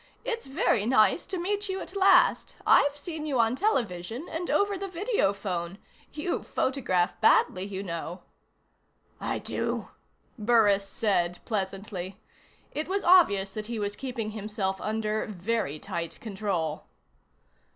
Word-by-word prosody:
It's 460 - -3
very 265 - +1
nice 240 +6 +4
to 380 - -3
meet 405 +3 -1
you 380 0 -2
at 375 - -8
last. 380 -3 +4
I've 285 0 +5
seen 310 0 -5
you 270 -4 0
on 230 +1 +3
television, 235 - -1
and 340 +2 -3
over 405 0 +2
the 390 +1 -4
video 375 - +1
phone. 185 -3 -4 0.3
You 310 +4 -2
photograph 205 -10 0
badly, 185 +1 +4
you 195 -1 -5
know." 170 0 -5 1.0
"I - - -2
do?" - - -3 0.5
Burris 205 -3 +4
said 180 -4 0
pleasantly. 195 -2 -4 0.5
It 305 - -3
was 395 +2 -1
obvious 200 - +5
that 215 -1 -5
he 235 -1 -4
was 205 -1 -2
keeping 240 -4 -4
himself 205 -2 -3
under 215 0 -1
very 210 -4 -2
tight 170 +2 -5
control. 190 -7 -3
215 Hz, 135 wpm, -28 LUFS, 195-315 Hz, 1.0 s, I've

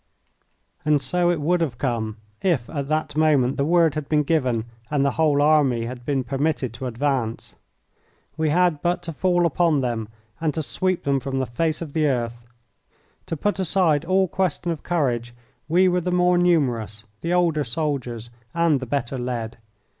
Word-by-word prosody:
And 150 -1 +3
so 175 +4 +1
it 175 -2 +1
would 170 +4 +1
have 135 -8 -1
come 115 -4 -2 0.2
if 160 -11 +1
at 140 -3 -3
that 155 0 -1
moment 145 -5 +3
the 140 - 0
word 165 0 +3
had 155 -2 -5
been 150 -1 +3
given 130 -7 0 0.2
and 145 -2 +1
the 140 - +2
whole 145 -1 +2
army 140 -6 +3
had 120 0 -8
been 140 -3 +1
permitted 135 -1 -1
to 130 +2 -5
advance. 125 -2 -2 0.8
We 155 0 0
had 170 -2 +2
but 175 0 0
to 165 -1 -5
fall 175 +1 +2
upon 165 -2 +2
them 120 -4 -2 0.3
and 155 -3 -1
to 160 - -1
sweep 185 +4 -1
them 140 -1 +1
from 135 0 -4
the 130 - 0
face 155 +7 -1
of 150 -4 -9
the 155 -2 +2
earth. 120 -3 -2 0.8
To 165 - -3
put 205 +5 -1
aside 165 -5 +2
all 190 +2 +2
question 180 -1 -1
of 160 - -4
courage, 120 -8 -1 0.3
we 180 +4 +4
were 180 0 +2
the 180 - -2
more 180 0 +3
numerous, 125 -12 +1 0.2
the 170 +1 -1
older 170 -4 +2
soldiers, 120 -4 -3 0.2
and 170 -4 +3
the 130 - -6
better 135 0 -2
led. 120 -2 -4
150 Hz, 180 wpm, -23 LUFS, 125-170 Hz, 0.8 s, we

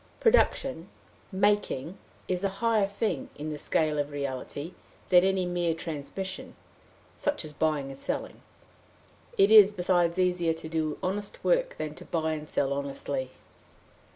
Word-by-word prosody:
Production, 270 - +2 0.4
making, 195 -5 +1 0.3
is 180 0 -1
a 195 - +2
higher 225 -2 +2
thing 200 -7 -2
in 155 +1 -5
the 150 - -4
scale 155 -1 +1
of 145 0 -1
reality, 145 +3 -5 0.4
than 180 -1 +7
any 190 -1 +2
mere 175 -2 0
transmission, 170 +4 -5 0.6
such 290 - -1
as 150 - -7
buying 150 -3 0
and 135 - -11
selling. - - -4 1.0
It 195 +2 +5
is, 210 -2 +9
besides, 175 -3 +1
easier 180 -3 +2
to 160 0 -7
do 160 -1 -1
honest 200 +2 -3
work - - +2
than 155 -1 -4
to - - -11
buy 160 -1 -1
and 150 -1 -6
sell 140 0 0
honestly. 140 -1 -3
170 Hz, 145 wpm, -28 LUFS, 150-195 Hz, 1.0 s, is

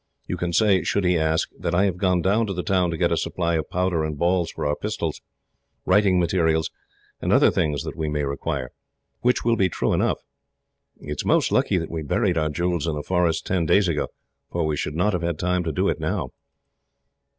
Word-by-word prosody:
You - - -3
can 90 0 -2
say, 100 0 +3
should 100 +3 0
he 90 0 +3
ask, 80 0 +1
that 85 - -1
I 95 +3 +4
have 95 -3 -1
gone 90 -2 +1
down 105 +5 +2
to 100 - -2
the 90 - -3
town 90 -2 +1
to 85 - -3
get - - +1
a - - +2
supply 85 -2 -1
of 80 -3 -1
powder 90 -3 0
and 75 -1 -3
ball 85 +1 +1
for 80 -1 -5
our 75 0 +1
pistols, - - -3 0.6
writing 95 -1 +4
materials, 80 -2 +1 0.5
and - - -1
other - - +5
things 75 -3 0
that - - -6
we 80 -2 -2
may 75 -1 -1
require; 70 -2 -3 0.5
which 125 -1 +1
will 115 -1 +3
be 95 -4 +2
true - - -1
enough. - - +1 0.8
It 70 - -8
is - - -1
most - - +2
lucky - - +2
that - - -3
we 80 -1 -3
buried 90 +5 0
our 75 0 0
jewels 85 +1 -1
in 80 - -1
the 75 - -4
forest, 85 -1 0
ten 90 -4 0
days 100 +4 +4
ago, 75 -4 0 0.4
for 85 -2 -1
we 80 -1 0
should 75 +1 -3
not 95 +5 +1
have 90 - -1
had 85 -2 -2
time 90 +1 0
to 80 - -1
do - - 0
it, - - 0
now." - - -2
85 Hz, 225 wpm, -23 LUFS, 80-90 Hz, 0.8 s, other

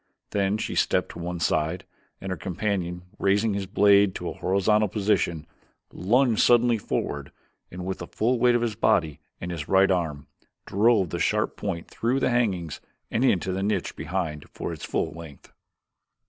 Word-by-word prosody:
Then 100 0 +1
she - - -3
stepped - - +1
to - - -9
one 85 0 -4
side, 80 +4 0 0.3
and 95 - -5
her - - -1
companion, 90 -2 -3 0.2
raising 100 +2 +2
his 100 -1 -3
blade 100 0 +4
to 85 - -4
a - - -5
horizontal 105 +3 +2
position, 95 -6 0 0.5
lunged 120 +4 +2
suddenly 120 -1 +4
forward - - -3 0.4
and 90 0 -7
with 95 0 -3
the 85 - -6
full 120 +3 0
weight 120 0 +4
of 120 - +1
his 115 -2 -1
body 85 - +1 0.2
and 90 - -5
his 80 -3 -5
right 95 0 +4
arm, 80 -6 -1 0.4
drove 100 -3 +2
the - - -3
sharp - - 0
point 85 -5 -4
through 125 +4 -1
the 130 - +1
hangings 95 -10 -1 0.3
and 115 - +1
into 95 -7 +2
the 95 +1 -2
niche 100 -2 -1
behind 80 -2 -4
for - - -5
its - - -7
full - - -1
length. 80 -4 -12
95 Hz, 175 wpm, -25 LUFS, 85-110 Hz, 0.5 s, blade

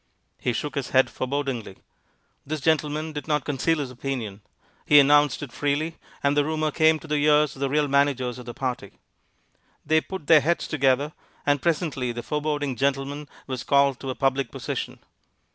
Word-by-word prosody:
He 125 - 0
shook 145 +5 -3
his 140 -2 -3
head 130 0 +3
forebodingly. 130 -6 -3 0.7
This 155 +2 -4
gentleman 155 +1 0
did 145 0 -6
not 150 -4 0
conceal 150 +3 +1
his 140 -4 -4
opinion. 120 -6 -5 0.4
He 150 - +7
announced 145 0 +4
it 135 - -7
freely, 150 +3 -1 0.3
and 140 0 +2
the 145 - +4
rumor 155 0 -1
came 160 0 +4
to 160 - -13
the 150 0 0
ears 150 -1 +4
of - - -13
the 140 0 0
real 150 +1 +2
managers 135 -3 +1
of 125 - -11
the 120 - -5
party. 125 -6 -4 0.9
They 160 0 +3
put 190 -3 -7
their 155 0 +7
heads 170 +4 0
together, 140 +1 +1 0.3
and 145 -1 +2
presently 150 -7 0
the 120 0 -6
foreboding 145 -2 -2
gentleman 140 +1 -1 0.2
was 130 -2 -4
called 140 -1 +3
to 135 - -6
a 130 - -3
public 135 0 0
position. - - -5
145 Hz, 180 wpm, -25 LUFS, 130-150 Hz, 0.9 s, He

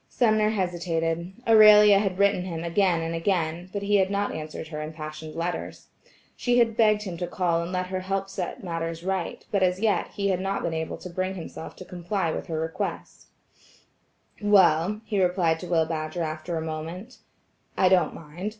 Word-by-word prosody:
Sumner 215 -3 +2
hesitated. 175 -3 -1 0.2
Aurelia 210 -2 +8
had 195 -3 -1
written 200 -1 +3
him 170 -3 -5
again 170 0 +2
and 165 0 -3
again, 165 0 -1
but 200 0 -4
he 205 0 +3
had 190 -1 +2
not 200 0 -1
answered 155 0 -6
her 155 -1 -5
impassioned 155 0 -7
letters. 170 +1 -4 0.5
She 245 -1 +1
had 230 -2 +3
begged 215 -2 +3
him 180 -4 -6
to 175 - -3
call 170 -2 0
and 170 +1 -5
let 185 0 -1
her 185 0 -3
help 195 +1 -2
set 190 -1 -5
matters 165 -1 -4
right, 190 -2 -3
but 200 - +1
as 180 0 +2
yet, 215 -1 +1
he 200 -1 0
had 185 -2 +1
not 195 +1 -2
been 165 - -1
able 160 0 -3
to 180 - -9
bring 185 +2 -2
himself 165 -2 -8
to 185 - -10
comply 180 -1 -2
with - - -5
her 160 -1 -3
request. 160 0 -5 1.1
"Well," 200 -1 +4
he 205 -3 0
replied 175 -3 +2
to 180 - -7
Will 165 -2 +2
Badger 160 +1 -3
after 155 +2 -4
a - - -2
moment, 165 +9 -6 0.6
"I 185 - +4
don't 180 -4 +3
mind. 165 +6 -6
180 Hz, 185 wpm, -26 LUFS, 165-200 Hz, 1.1 s, Aurelia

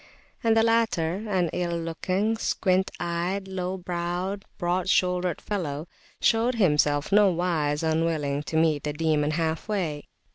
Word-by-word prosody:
And 225 -1 +3
the 225 - +5
latter, 220 -4 +1
an 180 -4 +1
ill 175 -1 -1
looking, 185 +6 -1
squint 190 -4 +1
eyed, 175 +3 -2
low 190 0 -3
browed, 180 +3 -3
broad 175 +1 -1
shouldered 180 -2 +1
fellow, 160 -6 -3 0.3
showed 235 +2 +2
himself 150 -7 +2
nowise 175 -7 +2
unwilling 160 -3 0
to 160 - -1
meet 160 -2 +3
the 150 - -2
Demon 150 -1 +1
half 160 +2 -1
way. 170 -9 -2
175 Hz, 135 wpm, -26 LUFS, 160-190 Hz, 0.3 s, the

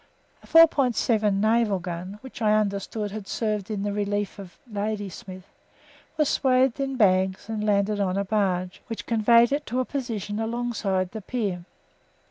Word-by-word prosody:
A - - -18
4.7 250 -9 +4
naval 215 0 +2
gun, 180 +2 -6
which, 260 -2 -11
I 215 -1 +4
understand, 205 0 -1
had 210 -1 -7
served 210 -3 -2
in 205 -2 -3
the 205 0 -2
relief 205 0 -2
of 185 -3 -11
Ladysmith, 205 -3 -5 0.7
was 305 -2 +3
swathed 260 -1 +2
in 270 -1 -2
bags 190 -4 +2
and 220 -1 -3
landed 205 0 +1
on 190 -1 0
a 200 - 0
barge, 185 -3 -1
which 225 - -6
conveyed 235 +1 +4
it 285 +1 -1
to 250 +3 -1
a 255 - 0
position 225 -7 -4
alongside 225 -5 -1
the 220 - -6
pier. 195 -6 -3
210 Hz, 155 wpm, -25 LUFS, 195-235 Hz, 0.7 s, 4.7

